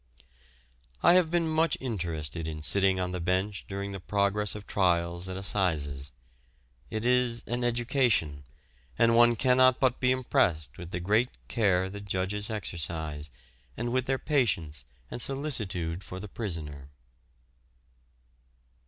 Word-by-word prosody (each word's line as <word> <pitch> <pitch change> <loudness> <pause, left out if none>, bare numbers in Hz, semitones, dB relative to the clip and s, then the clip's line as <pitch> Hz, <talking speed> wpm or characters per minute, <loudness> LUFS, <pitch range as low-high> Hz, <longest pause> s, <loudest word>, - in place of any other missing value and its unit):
I 170 - +7
have 180 -3 +4
been 170 -1 +1
much 160 0 +2
interested 85 - -4
in 80 -1 -5
sitting 95 +3 +3
on 90 0 -1
the 90 - -3
bench 95 +3 -1
during 100 0 -4
the 95 - -5
progress 100 +2 +1
of 105 -1 -8
trials 85 -1 0
at 95 - -4
Assizes. 75 -8 -1 0.8
It 110 +1 -3
is 125 -1 +2
an 120 +1 -2
education, 120 - +1 0.5
and 115 0 +4
one 120 0 +6
cannot 130 +1 +4
but 130 -2 +2
be 125 -1 +3
impressed 90 -11 0
with 85 -1 -7
the 90 - -3
great 105 +7 +2 0.2
care 95 -5 +2
the 100 +1 -7
judges 100 +1 -1
exercise, 80 -7 -3 0.5
and 120 +1 -2
with 130 0 0
their 135 0 +1
patience 85 - 0 0.3
and 120 - -3
solicitude 105 - -2
for 90 -1 -8
the 105 - -7
prisoner. 80 - -5
100 Hz, 135 wpm, -28 LUFS, 85-120 Hz, 0.8 s, I